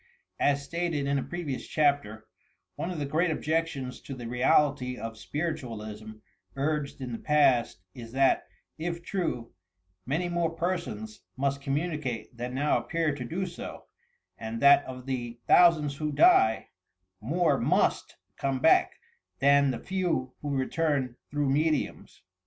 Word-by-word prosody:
As 140 0 +2
stated 165 -1 -2
in 140 0 +1
a - - -3
previous 165 -7 -5
chapter, 140 -8 +1 0.5
one 170 - -3
of 180 - -4
the 145 - -2
great 160 +5 +1
objections 155 -5 -2
to 135 - -7
the 120 -2 -8
reality 125 +1 +2
of 115 -1 -6
spiritualism 110 -8 -5 0.4
urged 145 0 -2
in 125 -2 -4
the 115 - -4
past, 130 - +2
is 115 -2 -10
that, 135 0 +3 0.3
if 170 +1 -3
true, 165 -12 -3 0.5
many 160 +7 0
more 170 -1 -1
i>ersons 165 - -3 0.2
must 140 +1 0
com 135 0 -1
municate 150 -7 -3
than 125 +2 -5
now 145 +3 +2
appear 165 -3 -1
to 140 -3 -5
do 175 +10 -3
so, 175 -1 -8 0.5
and 110 +1 -5
that 140 +2 +7
of 130 -1 -8
the 120 -3 -4
thousands 155 -5 +5
who 150 0 -2
die, 110 -6 +4 0.5
more 165 +9 +1
must - - +1 0.2
come 135 -1 -1
back 160 +5 +4 0.4
than 140 0 +4
the 125 - -1
few 165 -5 -2
who 145 - -4
return 135 -2 0
through 145 -1 0
mediums! 150 -3 -1
140 Hz, 145 wpm, -28 LUFS, 125-160 Hz, 0.5 s, that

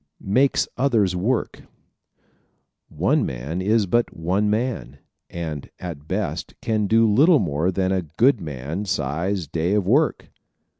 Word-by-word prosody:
Makes 135 +4 +3
Others 115 -8 +2
Work 110 +7 -1
¶ - - -22 1.2
One - - +1
man 70 +9 -4
is 105 +2 +2
but 120 +5 0
one 95 +6 0
man 110 - -2 0.3
and 80 -4 -5
at 80 -5 -8
best - - -3
can 110 -2 0
do 115 +2 +4
little 150 - +5
more 80 - 0
than 95 0 0
a 95 -1 +1 0.2
good 125 -1 +4
man 75 +5 -5
size 85 +1 -1
day 85 +6 -1
of 105 -3 +1
work. 145 - +1
95 Hz, 140 wpm, -22 LUFS, 80-115 Hz, 1.2 s, little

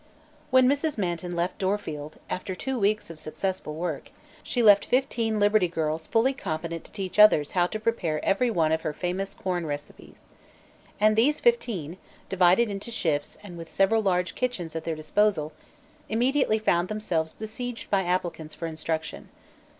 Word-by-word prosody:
When 260 -2 +5
Mrs. 285 +2 +1
Manton 175 -2 -2
left 175 +2 -2
Dorfield, 160 -7 -3
after 185 0 -4
two 265 +6 -3
weeks 205 -3 +1
of 160 - -5
successful 155 0 -4
work, 165 -2 -4 0.3
she 245 - -1
left 205 -2 +7
fifteen 235 -4 0
Liberty 205 -2 +4
Girls 160 -1 -2
fully 240 +4 +2
competent 165 -7 -4
to - - -16
teach 190 -1 -4
others 180 -9 +6
how 175 -1 +2
to 215 - -5
prepare 190 -9 -1
every 220 +6 +2
one 165 -7 +1
of 160 0 +1
her 155 - -3
famous 180 +5 -3
corn 175 -3 -2
recipes. 145 0 -8 0.8
And 215 +1 +4
these 265 +7 +3
fifteen, 215 - 0 0.3
divided 190 +4 +4
into 200 +2 -5
"shifts" 160 -10 -1
and 175 -4 -9
with 165 - -8
several 220 +3 +3
large 180 -3 0
kitchens 190 -11 -3
at 160 - -4
their 165 - -1
disposal, 155 0 +1 0.6
immediately 245 0 +2
found 175 -5 +1
themselves 180 -7 -2
besieged 225 +2 -6
by 195 -1 +3
applicants 175 -3 -2
for 165 - -5
instruction. 160 0 -4
185 Hz, 160 wpm, -26 LUFS, 165-220 Hz, 0.8 s, left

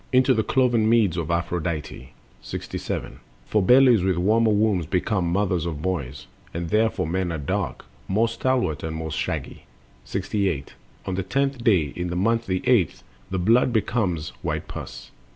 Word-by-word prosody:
Into 130 0 +4
the 110 - +2
cloven 120 -1 +2
meads 110 -7 +3
of 85 -2 -3
Aphrodite. 85 -5 -3 0.3
67. - - -5 0.3
For 105 - +1
bellies 125 +1 +6
with 95 0 +1
the - - -2
warmer 110 +4 +3
wombs 105 -6 +2
become 90 +1 0
Mothers 90 -3 0
of 75 -3 -5
boys, 70 -8 -3 0.3
and 85 0 -3
therefore 110 -3 +2
men 90 +2 -1
are 80 - -2
dark, 75 - -3 0.2
More 110 +4 +2
stalwart 120 - 0
and 80 0 -4
more 80 0 -4
shaggy. - - -4 0.4
68. 95 -9 -2 0.3
On 95 - -2
the 95 - -1
tenth 135 +5 -1
day, 85 -12 +3
in 90 0 -3
month 115 +4 +1
the 95 -1 -2
eighth, 110 - +2 0.3
the 95 - -2
blood 115 +7 +3
Becomes 105 -8 0
white - - -3
pus. - - -8
95 Hz, 160 wpm, -24 LUFS, 85-115 Hz, 0.4 s, bellies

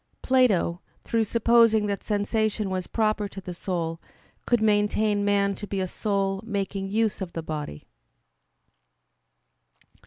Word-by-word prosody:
Plato, 210 -9 +2 0.2
through 225 -1 +1
supposing 230 -1 +4
that 200 -1 -2
sensation 210 -1 0
was 185 -1 -3
proper 215 -2 0
to 195 - -9
the 180 -1 -7
soul, 170 -2 -3 0.5
could 240 - +3
maintain 210 -1 +2
man 200 -1 +2
to 205 +1 -7
be 195 - -3
a 185 - -1
soul 195 -1 -1
making 200 -2 -3
use 220 0 0
of 180 -3 -5
the 165 - -4
body. 150 - -6
205 Hz, 130 wpm, -26 LUFS, 190-220 Hz, 0.5 s, supposing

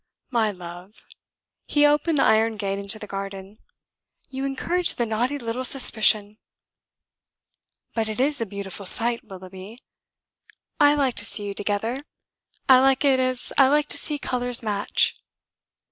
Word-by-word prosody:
"My 225 -3 +1
love," 180 +1 -11 0.6
he 295 0 +3
opened 295 +2 +2
the - - +3
iron 220 +1 +2
gate 195 -1 -3
into 200 +2 -4
the 215 - -9
garden, 195 0 -7 0.7
"you 265 0 -5
encourage 345 +6 -1
the 240 - -1
naughty 240 +6 -1
little 240 0 -4
suspicion." 215 -5 +3 1.5
"But 225 -1 -2
it 215 - -5
is 280 0 +1
a 230 - -2
beautiful 200 -1 -7
sight, 235 +4 +3
Willoughby. 190 +1 -11 1.0
I 290 0 +5
like 275 -4 0
to - - +2
see 205 - +2
you 200 - -4
together. 210 +6 -3 0.6
I 260 -1 +7
like 270 +2 +2
it 270 -2 +3
as 255 -1 -1
I 270 - +7
like 295 +2 +2
to - - +4
see 300 - +1
colours 245 -3 -2
match." 205 -2 0
230 Hz, 145 wpm, -23 LUFS, 205-270 Hz, 1.5 s, I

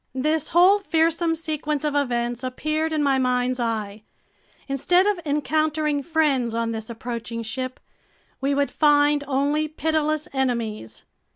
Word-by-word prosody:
This 305 +3 0
whole 370 +4 +5
fearsome 330 -2 +1
sequence 305 -2 -3
of 300 - 0
events 240 -3 -1
appeared 310 +5 -2
in 305 -2 0
my 275 -2 +2
mind's 250 0 0
eye. 220 -3 -3 0.7
Instead 350 +7 +2
of 410 -3 +1
encountering 300 0 0
friends 275 -7 +1
on 230 0 -1
this 220 0 -5
approaching 230 0 -5
ship, 255 +3 -4 0.6
we 275 +1 +1
would 285 0 0
find 290 -1 +3
only 285 +3 +1
pitiless 310 0 -1
enemies. 230 - -2
285 Hz, 130 wpm, -23 LUFS, 245-310 Hz, 0.7 s, whole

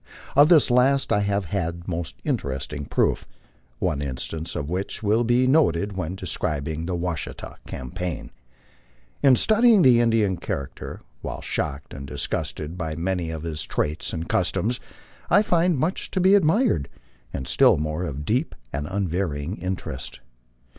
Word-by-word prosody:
Of 145 +3 +7
this 155 -7 +6
last 135 +2 +3
I 105 - +3
have 100 -1 0
had 85 -1 -3
most 85 -7 -3
interesting 70 +1 -2
proof, - - +1 0.5
one 70 +3 -1
instance 75 +4 -3
of 70 - -3
which 95 +6 -3
will 110 +3 +3
be 120 +2 +3
noted 105 - +3
when 90 -1 -3
describing 80 -3 -3
the 90 - -1
Washita 85 -2 -4
campaign. 80 +7 -5 0.9
In 135 -3 +6
studying 220 - +5
the 120 -3 +6
Indian 110 -6 +2
char 70 -1 -3
acter, - - -8 0.2
while - - -5
shocked 70 +1 -3
and 70 0 -7
disgusted 80 +5 -4
by 80 -2 -3
many 85 0 -1
of 80 -1 -5
his 80 -2 -3
traits 75 +2 -2
and 80 -1 -4
customs, 110 +3 0 0.5
I 205 - +6
find 175 -4 +2
much 160 +8 -1
to 190 - -1
be 190 +2 +5
admired, 175 - +3 0.4
and 65 0 -5
still - - +5
more 75 +3 -2
of 75 -3 -4
deep 125 - 0 0.2
and 75 +1 -2
unvarying 90 -3 -2
interest. 90 -6 -4
90 Hz, 150 wpm, -24 LUFS, 80-120 Hz, 0.9 s, Of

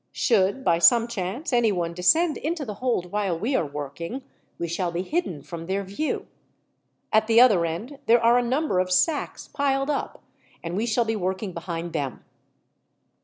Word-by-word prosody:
Should, 210 +2 +2
by 170 -5 +3
some 230 +6 +6
chance, 235 - -4
anyone 195 -8 +1
descend 310 - +3
into 315 -1 -3
the 215 - -5
hold 230 -9 -1
while 200 -5 -1
we 235 +10 -1
are 165 - +1
working, 150 - -6 0.3
we 170 - -3
shall 170 +1 -2
be 175 +2 -2
hidden 190 - -2
from 165 0 -8
their 195 +1 -1
view. 200 +11 -3 0.9
At 220 0 +4
the 230 0 +5
other 205 -9 +5
end 225 - -6
there 235 +1 +6
are 235 +1 +4
a - - 0
number 255 -4 0
of 185 0 0
sacks 295 - 0
piled 280 0 0
up, 285 - -4 0.4
and 170 +1 -4
we 220 +4 -1
shall 235 +1 +1
be 225 0 -1
working 190 0 -3
behind 170 0 -5
them." 135 -4 -4
205 Hz, 175 wpm, -25 LUFS, 175-250 Hz, 0.9 s, some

